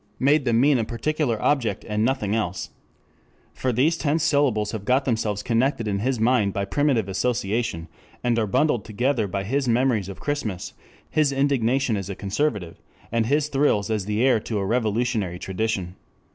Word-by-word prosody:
Made 140 Hz, +1 st, +3 dB
them 115 Hz, -2 st, +3 dB
mean 140 Hz, 0 st, +4 dB
a -, -, +1 dB
particular 120 Hz, +1 st, -1 dB
object 135 Hz, -6 st, 0 dB
and 105 Hz, 0 st, 0 dB
nothing 115 Hz, -4 st, 0 dB
else. 100 Hz, -4 st, -3 dB, 0.8 s
For 130 Hz, -, -1 dB
these 145 Hz, +8 st, +2 dB
tense 155 Hz, 0 st, 0 dB
syllables 140 Hz, -9 st, +2 dB
have 110 Hz, -3 st, -5 dB
got 130 Hz, +5 st, +2 dB
themselves 110 Hz, -4 st, -1 dB
connected 120 Hz, 0 st, +1 dB
in 100 Hz, -1 st, -1 dB
his 125 Hz, +2 st, -1 dB
mind 110 Hz, -4 st, +2 dB
by 100 Hz, 0 st, -1 dB
primitive 125 Hz, -1 st, +1 dB
association, 105 Hz, -3 st, -1 dB, 0.4 s
and 120 Hz, -1 st, +2 dB
are 110 Hz, -, 0 dB
bundled 120 Hz, +1 st, +1 dB
together 120 Hz, +1 st, 0 dB
by 100 Hz, +1 st, -3 dB
his 135 Hz, +6 st, -1 dB
memories 115 Hz, -5 st, +1 dB
of 95 Hz, -, -8 dB
Christmas, 110 Hz, -11 st, -3 dB, 0.3 s
his 150 Hz, -2 st, +2 dB
indignation 135 Hz, -3 st, +1 dB
as 100 Hz, 0 st, -5 dB
a 100 Hz, -, -4 dB
conservative, 100 Hz, -, -2 dB, 0.3 s
and 115 Hz, -1 st, +1 dB
his 145 Hz, +3 st, +2 dB
thrills 135 Hz, -8 st, +1 dB
as 105 Hz, -3 st, -1 dB
the 105 Hz, +4 st, +1 dB
heir 125 Hz, -4 st, +4 dB
to 110 Hz, 0 st, -4 dB
a 100 Hz, -, -1 dB
revolutionary 110 Hz, -3 st, 0 dB
tradition. 95 Hz, -1 st, -3 dB
115 Hz, 175 wpm, -24 LUFS, 105-135 Hz, 0.8 s, mean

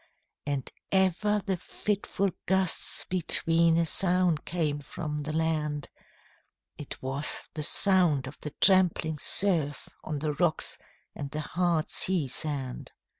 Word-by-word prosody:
And 140 Hz, -2 st, -3 dB, 0.2 s
ever 195 Hz, +2 st, +1 dB
the 190 Hz, -2 st, -1 dB
fitful 200 Hz, +1 st, -3 dB, 0.2 s
gusts 190 Hz, -2 st, 0 dB
between 165 Hz, -2 st, +3 dB
A 170 Hz, -, +2 dB
sound 180 Hz, -2 st, +2 dB
came 155 Hz, -4 st, -2 dB
from 150 Hz, +1 st, -6 dB
the 150 Hz, +1 st, -5 dB
land; 155 Hz, -2 st, -2 dB, 0.9 s
It 145 Hz, -, -9 dB
was 135 Hz, +3 st, 0 dB
the 155 Hz, -, -5 dB
sound 175 Hz, -4 st, +3 dB
of 135 Hz, +2 st, -10 dB
the 150 Hz, -, -7 dB
trampling 180 Hz, -5 st, +3 dB
surf, 165 Hz, -7 st, +2 dB
On 155 Hz, -1 st, -4 dB
the 150 Hz, +1 st, -2 dB
rocks 160 Hz, +1 st, 0 dB, 0.3 s
and 140 Hz, -, -7 dB
the 155 Hz, +1 st, -4 dB
hard 170 Hz, 0 st, -1 dB
sea 180 Hz, -7 st, +1 dB
sand. 135 Hz, -2 st, -4 dB
160 Hz, 125 wpm, -27 LUFS, 150-185 Hz, 0.9 s, between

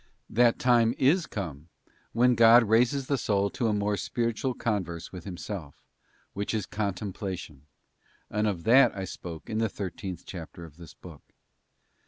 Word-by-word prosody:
That 120 Hz, 0 st, +4 dB
time 120 Hz, -1 st, +3 dB
is 155 Hz, +6 st, +3 dB
come 80 Hz, -6 st, -6 dB, 0.4 s
when 125 Hz, +2 st, +4 dB
God 115 Hz, +1 st, +7 dB
raises 120 Hz, +5 st, +2 dB
the 140 Hz, -1 st, 0 dB
soul 100 Hz, -2 st, +1 dB
to 120 Hz, -, -1 dB
a -, -, +2 dB
more 105 Hz, 0 st, 0 dB
spiritual 120 Hz, +3 st, -2 dB
converse 90 Hz, -7 st, -3 dB
with 90 Hz, -3 st, -9 dB
Himself, 90 Hz, -5 st, -7 dB, 0.5 s
which 100 Hz, +3 st, -3 dB
is 105 Hz, -3 st, -1 dB
contemplation, 95 Hz, -7 st, -5 dB, 0.6 s
and 105 Hz, +1 st, -1 dB
of 90 Hz, -5 st, -2 dB
that 120 Hz, -2 st, +5 dB
I 95 Hz, -, -3 dB
spoke 85 Hz, -3 st, -8 dB
in 110 Hz, -, -2 dB
the 110 Hz, -1 st, +1 dB
thirteenth 95 Hz, -2 st, -6 dB
chapter 85 Hz, -1 st, -9 dB
of 80 Hz, -1 st, -15 dB
this 85 Hz, -3 st, -13 dB
book. -, -, -13 dB
105 Hz, 155 wpm, -28 LUFS, 90-115 Hz, 0.6 s, God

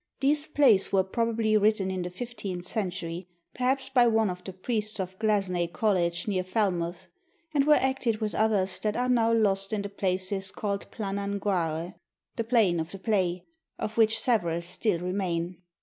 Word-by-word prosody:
These 290 Hz, +3 st, +2 dB
plays 255 Hz, -10 st, +4 dB
were 195 Hz, -1 st, +4 dB
probably 225 Hz, +2 st, 0 dB
written 210 Hz, -2 st, +2 dB
in 185 Hz, -1 st, -2 dB
the 175 Hz, -, -3 dB
fifteenth 195 Hz, -3 st, -6 dB
century, 180 Hz, -4 st, -3 dB, 0.3 s
perhaps 260 Hz, +2 st, 0 dB
by 245 Hz, -3 st, +4 dB
one 220 Hz, -3 st, +2 dB
of 180 Hz, 0 st, -8 dB
the 190 Hz, -, -6 dB
priests 215 Hz, +2 st, -3 dB
of 185 Hz, 0 st, -5 dB
Glazeney 195 Hz, -5 st, +1 dB
College 175 Hz, -5 st, 0 dB
near 190 Hz, -3 st, 0 dB
Falmouth, 180 Hz, -3 st, -1 dB, 0.5 s
and 285 Hz, -1 st, +2 dB
were 300 Hz, -, +7 dB
acted 265 Hz, -5 st, +1 dB
with 215 Hz, -1 st, -3 dB
others 195 Hz, -4 st, +1 dB
that 210 Hz, +2 st, -1 dB
are 250 Hz, +1 st, +1 dB
now 230 Hz, -2 st, +3 dB
lost 195 Hz, -3 st, +2 dB
in 210 Hz, -2 st, -1 dB
the 200 Hz, -, -4 dB
places 190 Hz, 0 st, -2 dB
called 200 Hz, -1 st, -3 dB
Planan 200 Hz, -1 st, -3 dB
Guare 175 Hz, -3 st, -1 dB, 0.4 s
(the 230 Hz, -, -1 dB
Plain 220 Hz, -7 st, +3 dB
of 160 Hz, 0 st, -3 dB
the 195 Hz, -, -6 dB
Play), 185 Hz, -4 st, 0 dB, 0.3 s
of 215 Hz, 0 st, -4 dB
which 225 Hz, -1 st, +4 dB
several 170 Hz, -9 st, +1 dB
still 180 Hz, +2 st, 0 dB
remain. 180 Hz, -1 st, -2 dB
200 Hz, 170 wpm, -28 LUFS, 185-225 Hz, 0.5 s, were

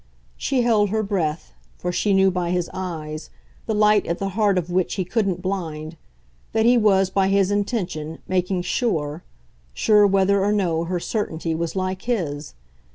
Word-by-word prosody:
She 260 Hz, -3 st, 0 dB
held 215 Hz, -4 st, +3 dB
her 220 Hz, +2 st, 0 dB
breath, 175 Hz, -6 st, -2 dB, 0.2 s
for 180 Hz, -, -3 dB
she 205 Hz, +3 st, 0 dB
knew 190 Hz, 0 st, +4 dB
by 180 Hz, -1 st, -2 dB
his 180 Hz, -1 st, -1 dB
eyes, 155 Hz, -4 st, -5 dB, 0.4 s
the 220 Hz, -, 0 dB
light 210 Hz, 0 st, +4 dB
at 170 Hz, -, -1 dB
the 195 Hz, -, -2 dB
heart 200 Hz, -1 st, +2 dB
of 175 Hz, -1 st, -2 dB
which 180 Hz, 0 st, 0 dB
he 185 Hz, -, -2 dB
couldn't 195 Hz, -3 st, -1 dB
blind, 165 Hz, -5 st, -4 dB, 0.6 s
that 220 Hz, 0 st, +2 dB
he 245 Hz, +1 st, +6 dB
was, 195 Hz, -4 st, +3 dB
by 190 Hz, 0 st, +2 dB
his 195 Hz, 0 st, +2 dB
intention, 185 Hz, -7 st, -2 dB
making 180 Hz, 0 st, 0 dB
sure 160 Hz, -, -1 dB, 0.5 s
sure 210 Hz, -1 st, +5 dB
whether 195 Hz, 0 st, +3 dB
or 205 Hz, -, +2 dB
no 170 Hz, -5 st, 0 dB
her 175 Hz, +1 st, -2 dB
certainty 165 Hz, -5 st, -2 dB
was 165 Hz, +2 st, -3 dB
like 185 Hz, 0 st, -2 dB
his. 155 Hz, -, -3 dB
190 Hz, 170 wpm, -22 LUFS, 170-205 Hz, 0.6 s, he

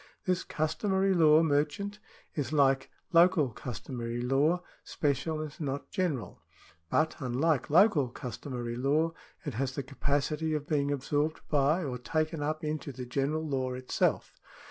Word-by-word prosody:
This 185 Hz, -1 st, +1 dB
customary 190 Hz, +5 st, 0 dB
law 160 Hz, -2 st, +6 dB
merchant 160 Hz, +8 st, 0 dB, 0.3 s
is, 140 Hz, -3 st, -2 dB
like 135 Hz, -3 st, +3 dB, 0.2 s
local 170 Hz, -4 st, +5 dB
customary 120 Hz, 0 st, -5 dB
law, 140 Hz, +8 st, +2 dB, 0.2 s
special 150 Hz, +2 st, -1 dB
and 155 Hz, -2 st, -7 dB
not 140 Hz, -1 st, -3 dB
general; 145 Hz, -, -2 dB, 0.5 s
but, 155 Hz, 0 st, +2 dB
unlike 135 Hz, +2 st, +1 dB
local 160 Hz, -, +5 dB
customary 120 Hz, 0 st, -5 dB
law, 150 Hz, +6 st, +1 dB, 0.3 s
it 145 Hz, -, -3 dB
has 130 Hz, +3 st, -2 dB
the 140 Hz, -, -2 dB
capacity 145 Hz, +3 st, -1 dB
of 150 Hz, -1 st, -3 dB
being 145 Hz, -2 st, +1 dB
absorbed 145 Hz, +3 st, -1 dB
by, 150 Hz, +4 st, +3 dB
or 125 Hz, -4 st, -3 dB
taken 155 Hz, +4 st, -1 dB
up 155 Hz, +2 st, -2 dB
into 150 Hz, -1 st, -3 dB
the 125 Hz, -1 st, -7 dB
general 145 Hz, +5 st, -1 dB
law 130 Hz, -3 st, -1 dB
itself. 125 Hz, 0 st, 0 dB
145 Hz, 140 wpm, -30 LUFS, 130-160 Hz, 0.5 s, law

